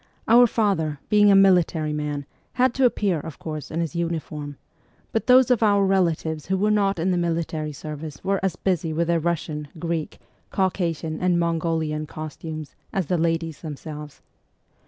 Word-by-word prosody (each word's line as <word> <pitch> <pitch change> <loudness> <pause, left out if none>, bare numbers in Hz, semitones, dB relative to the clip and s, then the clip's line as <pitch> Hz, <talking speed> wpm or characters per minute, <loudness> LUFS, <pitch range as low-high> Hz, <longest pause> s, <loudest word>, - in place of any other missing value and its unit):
Our 240 +2 +7
father, 185 -10 0
being 205 -1 +5
a 200 - +6
military 175 -5 +4
man, 150 -1 -3 0.3
had 255 -1 +2
to 265 +1 +2
appear, 200 -8 +1
of 160 0 -8
course, 155 -2 -6
in 165 +2 -2
his 165 -3 -3
uniform; 155 -4 -3 0.5
but 225 - -1
those 255 0 +6
of 245 - +3
our 200 -2 +4
relatives 165 -5 0
who 190 +1 +1
were 210 +3 +2
not 200 -2 +2
in 175 +3 0
the 180 - +1
military 165 -2 -2
service 150 0 -8
were 195 0 +1
as 190 -3 0
busy 175 -4 -1
with 170 +1 0
their 170 -1 +3
Russian, 160 -2 -2
Greek, 165 -1 -3 0.3
Caucasian, 170 -4 -1
and 180 -1 +2
Mongolian 160 -2 -1
costumes, 155 0 -7 0.2
as 190 -3 -1
the 175 +4 0
ladies 165 -1 -1
themselves. 150 -1 -8
165 Hz, 165 wpm, -24 LUFS, 155-190 Hz, 0.5 s, Our